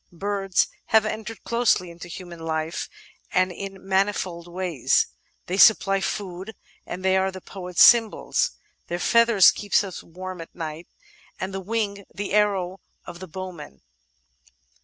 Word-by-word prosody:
Birds 195 -1 +1 0.2
have 220 -1 +4
entered 220 +1 -5
closely 230 -7 +1
into 170 +1 -10
human 175 0 -9
hf 160 0 -3
e, - - -35 0.4
and 185 0 +3
in 195 +1 -8
manifold 190 -3 0
ways. 175 -7 +1 0.4
They 185 - -3
supply 195 -2 +6
food, 190 +1 -4 0.3
and 185 +2 -6
they 190 0 +4
are 190 0 +1
the 185 - -8
poet's 180 -2 +1
symbols. 235 - +4 0.4
Their 175 - -2
feathers 230 0 +6
keep 205 -1 -8
us 190 -3 -7
warm 185 +1 -8
at 165 - -12
night, 160 0 -6 0.5
and 190 0 -5
wing 205 -3 -2
the 205 0 -5
arrow 195 -3 +1 0.3
of 175 0 -9
the 185 - -8
bowman. 170 - -8
190 Hz, 140 wpm, -24 LUFS, 175-200 Hz, 0.5 s, supply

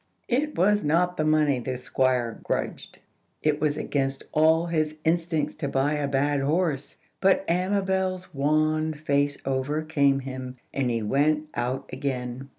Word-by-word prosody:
It 290 +5 0
was 205 +4 +3
not 175 +4 +2
the 155 - 0
money 155 -3 +3
the 125 +1 -3
Squire 125 -2 0
grudged; - - -3 0.5
it 150 -1 +1
was 150 -1 +1
against 135 -3 -2
all 160 +2 +4
his 155 -2 -1
instincts 165 -1 +1
to 140 - -2
buy 140 +2 +1
a 145 -1 -1
bad 140 +1 +1
horse. 150 0 -1 0.2
But 195 0 +3
Amabel's 190 0 0
wan 155 +2 +1
face 145 -1 0
overcame 140 +1 +1
him, 130 -1 -7 0.2
and 135 -2 0
he 115 -2 -1
went 150 +6 +1
out 125 +3 -2
again. 130 -1 -4
150 Hz, 145 wpm, -26 LUFS, 135-160 Hz, 0.5 s, all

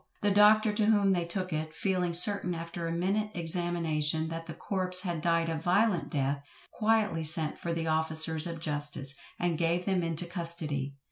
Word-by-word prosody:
The 205 - +2
doctor 210 +1 +5
to 210 0 0
whom 205 -3 +3
they 175 -2 -1
took 185 +1 -4
it, 155 +1 -4
feeling 180 -2 -1
certain 180 -1 +6
after 165 0 -6
a - - -3
minute 195 +5 -1
examination, 165 -2 -1
that 165 0 -6
the 160 - -7
corpse 185 -2 0
had 175 -4 -3
died 165 0 +1
a 165 - -2
violent 175 0 +1
death, 140 0 -2 0.3
quietly 215 -7 0
sent 155 0 +4
for 170 - -4
the 165 -1 -3
officers 160 0 0
of 165 -1 -6
justice, 145 -3 -2 0.2
and 175 -2 -1
gave 170 +1 0
them 190 -2 0
into 165 0 -2
custody. 165 -5 -4
170 Hz, 180 wpm, -29 LUFS, 160-185 Hz, 0.3 s, certain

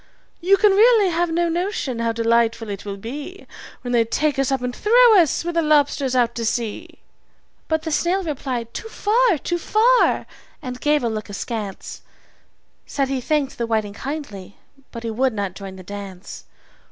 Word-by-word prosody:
"You 385 +3 +4
can 420 0 +5
really 425 0 +5
have 345 0 0
no 340 +1 +1
notion 335 - -2
how 230 0 0
delightful 230 -1 +1
it 200 0 -7
will 200 -1 -5
be 290 - -8 0.4
When 245 - -5
they 235 -1 +4
take 280 +5 -1
us 270 0 +1
up 265 -2 -1
and 250 0 -3
throw 465 -1 +6
us, 330 -2 +2
with 345 - -2
the 335 - +2
lobsters, 290 -4 +2
out 245 -2 +2
to 235 - -4
sea!" 235 +9 -3 0.7
But 315 0 0
the 320 - -3
snail 350 +6 +1
replied 255 -7 -4
"Too 445 - -6
far, 445 -2 +2
too 345 +4 -3
far!" 470 +7 +3 0.3
and 250 -4 -7
gave 295 -2 +2
a - - +1
look 215 -2 -4
askance 205 -1 -6 0.9
Said 275 -2 -1
he 270 -2 -1
thanked 290 -1 -1
the 235 - -1
whiting 215 -3 -1
kindly, 215 -8 -7 0.3
but 230 -1 -8
he 230 - -3
would 255 +3 +1
not 200 -3 -3
join 195 -1 -9
the 185 - -11
dance. 195 -1 -9
265 Hz, 180 wpm, -21 LUFS, 230-340 Hz, 0.9 s, throw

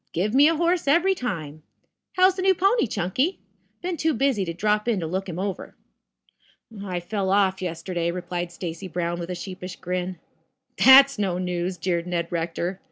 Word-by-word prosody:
Give 200 +6 -1
me 280 +3 +6
a 330 - +2
horse 340 0 +1
every 345 +7 +4
time. 160 - -5 0.5
How's 370 +1 +5
the 375 - -4
new 380 0 +4
pony, 390 - +2
Chunky? 255 - -1 0.5
Been 355 -1 -2
too 315 0 +1
busy 265 -5 +1
to 170 - -3
drop 210 +5 0
in 225 -5 +1
to 165 - -3
look 190 +4 -3
him 170 - -5
over." 195 0 -4 1.1
"I 180 -3 -3
fell 195 +2 -3
off 190 -1 +2
yesterday," 170 0 -3
replied 175 0 -4
Stacy 170 +1 -6
Brown 175 -1 -3
with 170 0 -6
a 180 - -3
sheepish 185 0 -7
grin. 180 0 -4 0.7
"That's 275 -1 +8
no 190 -4 0
news," 180 0 -2
jeered 170 0 -2
Ned 170 -1 -2
Rector. 170 +2 -3
185 Hz, 175 wpm, -24 LUFS, 175-265 Hz, 1.1 s, That's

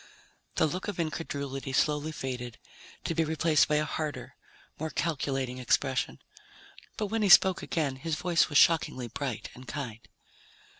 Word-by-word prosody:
The - - +3
look 180 +5 -3
of 205 -4 -4
incredulity 140 -4 -3
slowly 150 +3 +1
faded, 125 -5 -5 0.5
to - - -1
be 165 0 +2
replaced 160 0 +3
by 150 - +1
a 150 0 +2
harder, 155 0 -4 0.4
more 160 +1 -2
calculating 135 -5 -2
expression. 130 +1 0 0.8
But 215 - -1
when 225 - +1
he 205 - +2
spoke 190 0 +7
again, 145 -5 -1
his 155 +3 -2
voice 175 0 +2
was 145 - +2
shockingly 140 -8 +3
bright 130 -2 -4
and 125 +1 -13
kind. 125 -7 -5
150 Hz, 150 wpm, -29 LUFS, 130-165 Hz, 0.8 s, spoke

